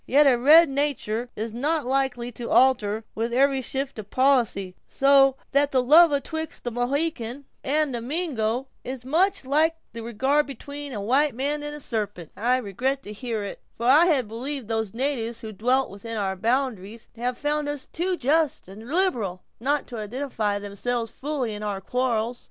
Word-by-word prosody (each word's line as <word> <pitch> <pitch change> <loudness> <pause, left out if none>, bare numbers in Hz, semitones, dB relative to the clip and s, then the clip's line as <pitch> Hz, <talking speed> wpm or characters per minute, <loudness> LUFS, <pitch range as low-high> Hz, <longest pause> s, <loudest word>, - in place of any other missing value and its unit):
Yet 290 +3 +5
a 270 -3 +6
red 305 +7 +7
natur' 270 -5 -1
is 220 +1 -4
not 295 +5 0
likely 255 -2 0
to 235 0 -7
alter 225 -5 +3
with 230 +2 -2
every 270 +2 +3
shift 270 -1 -3
of 210 -1 -8
policy; 240 -8 +2
so 275 -1 +5 0.2
that 280 +1 +3
the 255 -2 +2
love 320 +5 +7
atwixt 315 +2 -3
a 240 - -1
Mohican 260 +1 -2 0.2
and 290 -1 +1
a 235 - -3
Mingo 260 -4 -1 0.2
is 255 -1 -6
much 360 +4 +2
like 310 +4 +3 0.2
the 230 - -6
regard 265 +6 +1
between 285 +2 -7
a 215 - -4
white 260 +6 +2
man 290 +4 -1
and 295 0 -5
a - - -8
sarpent." 205 - -4
"I 245 +4 +2
regret 255 +5 -2
to 210 - -8
hear 225 -1 -4
it; 200 - -7 0.2
for 235 - -4
I 295 +7 +6
had 270 -9 +2
believed 250 +3 -5
those 220 -2 -2
natives 235 -3 -2
who 220 -2 -6
dwelt 250 +5 +1
within 225 +3 -6
our 195 -2 -1
boundaries 230 -1 -2
had 240 +1 -2
found 295 0 -1
us 290 -2 -5
too 360 +2 -1
just 300 - +1
and 210 +4 -11
liberal, 245 - 0 0.2
not 285 +5 0
to 235 -3 -6
identify 215 -2 -2
themselves 225 +3 -3
fully 275 -4 -3
with 210 0 -6
our 205 -2 -3
quarrels." 240 +1 -1
255 Hz, 180 wpm, -25 LUFS, 225-285 Hz, 0.2 s, red